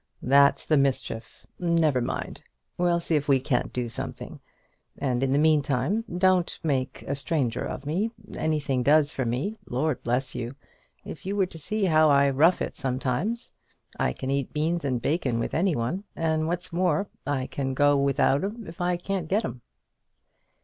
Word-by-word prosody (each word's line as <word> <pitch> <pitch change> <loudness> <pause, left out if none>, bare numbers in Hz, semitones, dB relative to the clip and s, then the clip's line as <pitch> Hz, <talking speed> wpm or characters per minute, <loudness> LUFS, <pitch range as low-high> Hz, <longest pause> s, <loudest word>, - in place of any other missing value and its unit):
"That's 140 +2 +4
the 155 - +3
mischief! 130 -4 -1
Never 165 -6 +2
mind. 120 - -4 0.3
We'll 175 -1 +2
see 170 - -2
if 145 -1 0
we 135 -2 +4
can't 130 -1 -1
do 125 -1 -2
something. 115 - -6 0.6
And 125 -3 -1
in 135 - +1
the 135 - +2
meantime 150 - +2
don't 185 -1 +3
make 135 -5 -1
a 140 - -3
stranger 140 -4 -1
of 135 - -5
me. 180 +10 0 0.3
Anything 145 -5 0
does 145 +3 +4
for 130 - -2
me. 135 - -2
Lord 135 +2 -1
bless 125 +2 -1
you! 125 +1 -5 0.5
if - - -8
you 200 - -1
were 195 -2 +3
to 165 -3 -11
see 215 +6 -1
how 155 -3 +5
I 140 -1 +5
rough 160 +7 +4
it - - -5
sometimes! 135 - -2 0.5
I - - +2
can 130 - -4
eat 140 -2 -1
beans 160 +2 0
and 130 -3 0
bacon 135 -3 0
with 115 - -2
any 175 0 +2
one; 150 - -2
and 160 -1 0
what's 175 0 -3
more, 180 +1 +1 0.2
I 135 -3 0
can 135 -1 -3
go 145 +1 +4
without 140 +1 +2
'em 215 +3 -4
if 165 +2 -9
I 175 0 +1
can't 185 -1 -3
get 210 +4 +1
'em." 120 0 -6
145 Hz, 175 wpm, -26 LUFS, 130-170 Hz, 0.6 s, how